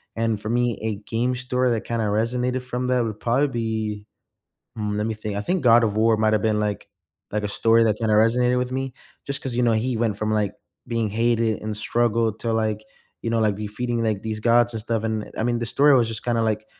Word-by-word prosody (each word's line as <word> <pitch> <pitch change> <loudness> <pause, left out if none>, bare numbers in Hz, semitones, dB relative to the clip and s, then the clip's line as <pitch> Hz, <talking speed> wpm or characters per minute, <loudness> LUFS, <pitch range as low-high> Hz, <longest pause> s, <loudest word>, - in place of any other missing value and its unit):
and 115 -2 -1
for 105 - -5
me, 120 -1 0
a 110 -1 -2
game 120 +2 0
story 125 0 0
that 115 -2 -1
kinda 115 -2 -1
resonated 125 +4 0
from 125 0 -3
that 125 -1 +2
would 110 -2 -4
probably 130 +5 +2
be 110 -4 -3 0.7
mm, 105 -1 -2
lemme 110 +1 -1
think 105 -1 -5
I 100 - -1
think 175 - -1
God 120 -1 +6
of 105 -1 0
War 110 0 +4
might 110 0 +2
have 105 - +1
been, 110 -1 +2
like 105 -1 -2 0.4
like 105 0 -1
a 105 - 0
story 115 +2 +3
that 110 -1 +1
kinda 110 -2 +1
resonated 125 +3 +3
with 125 0 -1
me, 135 0 -3 0.3
just 140 +1 -3
'cause, 130 -4 -4
you 125 - +1
know, 120 - +3
he 115 +2 0
went 110 -3 0
from, 110 +1 -1
like, 105 -2 0 0.3
being 115 -3 -1
hated 115 0 +1
and 110 0 -4
struggled 115 0 0
to, 115 -1 -1
like, 110 -1 -1 0.4
you 115 - -2
know, 115 0 +1
like, 105 -2 +2
defeating, 115 +3 -3
like, 110 -3 0
these 110 -1 -4
gods 120 +1 +3
and 110 - -4
stuff, 115 0 -2
and, 110 -1 -1
uh - - -12
I - - 0
mean, 120 0 +1
the 120 - -2
story 140 +5 +4
was 120 -3 +3
just 110 -1 -6
kinda, 120 -1 +1
like, 110 -1 -1
115 Hz, 240 wpm, -23 LUFS, 110-120 Hz, 0.7 s, God